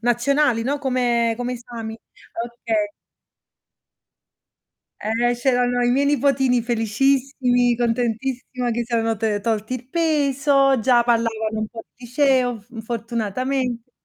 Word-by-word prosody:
nazionali 240 +1 +2
no, 280 +4 -1
come 245 -4 +1
come 245 +1 -3
esami. 230 -2 -7 0.5
Okay. 310 +7 -2 2.1
Eh, 235 +3 +1
c'erano 245 0 +1
i 240 - +3
miei 275 +3 +2
nipotini 270 -4 +2
felicissimi, 245 +2 +1
contentissima 245 +1 -1
che 235 +1 -1
siano 225 -1 0
te 215 -1 -1
tolti 220 +3 -2
il 250 0 -8
peso, 280 -4 +2
già 240 +1 +4
parlavano 225 -2 0
un 215 - -1
po' 225 +1 -9
di 245 - -14
liceo 250 -3 +2
f 225 +1 -10
fortunatamente. 235 +2 -3
245 Hz, 115 wpm, -22 LUFS, 230-265 Hz, 2.1 s, già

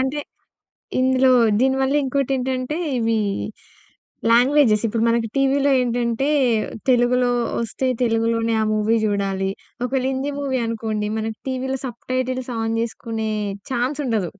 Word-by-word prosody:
అంటే 265 +3 -1 0.8
ఇందులో 260 0 +4 0.3
దీనివల్ల 265 +1 +2
ఇంకోటేంటంటే 265 0 -1 0.2
ఇవి 225 -1 +1 1.1
లాంగ్వేజెస్ 245 -2 +4
ఇప్పుడు 225 +1 -1
మనకు 230 0 +1
టీవీలో 275 +1 +3
ఏంటంటే 240 +1 0 0.6
తెలుగులో 245 0 +3 0.3
ఒస్తే 235 +3 -2 0.2
తెలుగులోనే 230 -1 +1
ఆ - - +2
మూవీ 215 +2 +2
జూడాలి. 195 -2 0 0.3
ఒకవేళ 255 +1 -1
హిందీ 270 +2 -2
మూవీ 265 -2 -1
అనుకోండి 220 -2 -2
మనకు 220 0 -3
టీవీలో 265 +1 -2
సబ్‌టైటిల్స్ 255 +1 -3
ఆన్ 225 0 -1
జేసుకునే 225 -1 -3 0.4
ఛాన్స్ 255 +4 -1
ఉండదు 215 -9 -1
245 Hz, 115 wpm, -21 LUFS, 225-265 Hz, 1.1 s, ఇందులో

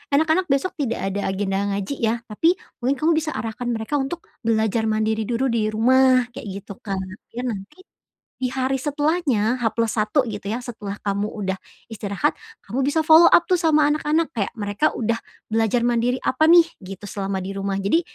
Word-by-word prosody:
"Anak-anak 320 +5 +2
besok 275 +6 +1
tidak 230 -7 -1
ada 200 +1 -2
agenda 195 0 -1 0.2
ngaji, 200 +8 -4
ya." 230 +1 0
tapi 325 - +1 0.2
mungkin 260 +3 +1
kamu 310 +5 +1
bisa 305 0 -4
arahkan 225 +2 -4
mereka 235 +5 -1
untuk 300 +6 -4 0.2
belajar 220 0 +1
mandiri 220 0 0
duru 245 +2 0
di 220 -2 +1
rumah 255 +3 +4
kayak 225 - -8 0.2
gitu 200 - -11
Kak. 195 -2 -4 0.4
Biar 245 0 -2
nanti 215 - -9 0.6
di 255 - 0
hari 265 0 -1
setelahnya 285 -6 0
H+1 230 +3 +1
gitu, 205 -3 -6
ya, 240 +3 -3
setelah 210 -4 -6
kamu 200 +1 -1
udah 190 -3 -3 0.3
istirahat, 205 +7 -1 0.3
kamu 240 +7 -3
bisa 290 +4 +1
follow 325 +2 +8
up, 345 - +5
tuh, 360 -2 +1
sama 305 -3 +4
anak-anak 310 +1 0
kayak 225 +1 -3
mereka 205 +7 0
udah 230 0 -1 0.3
belajar 225 +2 +2
mandiri 240 +1 +1
apa, 315 +5 +3
nih, 345 0 +8 0.2
gitu 190 +1 -9
selama 195 -2 -3
di 195 - -4
rumah. 195 0 -2
Jadi 195 +12 +2
235 Hz, 175 wpm, -22 LUFS, 210-280 Hz, 0.6 s, follow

